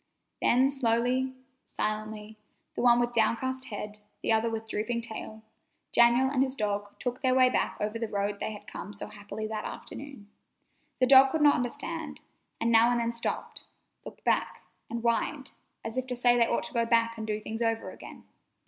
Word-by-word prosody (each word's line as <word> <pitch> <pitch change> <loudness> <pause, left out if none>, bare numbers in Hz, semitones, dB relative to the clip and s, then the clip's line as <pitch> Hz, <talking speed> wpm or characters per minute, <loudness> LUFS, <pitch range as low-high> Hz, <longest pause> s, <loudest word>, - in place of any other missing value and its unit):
Then 260 +3 +4
slowly, 255 0 +1 0.3
silently, 215 0 -3 0.4
the - - -3
one 240 -1 +6
with 240 0 0
downcast 260 +4 +1
head, 210 0 -6 0.2
the - - +1
other 225 +1 +3
with 225 0 -5
drooping 225 +3 -2
tail, 220 -1 -8 0.5
Daniel 240 +2 +5
and 265 -1 +1
his 265 0 0
dog 205 -3 -2
took 250 0 -4
their 260 -1 +2
way 255 -1 +5
back - - 0
over 210 +2 -2
the 230 - -2
road 200 0 -2
they - - -2
had 210 - -10
come 210 - -8
so 205 - -5
happily 205 +1 -7
that 215 0 -4
afternoon. 275 -7 -8 0.7
The 255 - +5
dog 270 +1 +8
could 320 - 0
not 295 -1 +7
understand, 290 +6 -4 0.4
and 230 - +1
now 230 +1 +6
and 240 -1 +1
then 235 0 -1
stopped, 235 - -4 0.4
looked - - -11
back, - - 0 0.3
and 235 0 -3
whined, 255 +4 0 0.3
as 225 +3 -2
if 255 - -5
to 250 - -3
say 245 0 +4
they 235 -1 +4
ought - - 0
to 315 - -6
go 235 -2 +2
back 230 -1 +3
and 220 - -5
do 215 0 -1
things 220 +2 -6
over 225 -1 -1
again. - - -12
235 Hz, 190 wpm, -29 LUFS, 220-255 Hz, 0.7 s, dog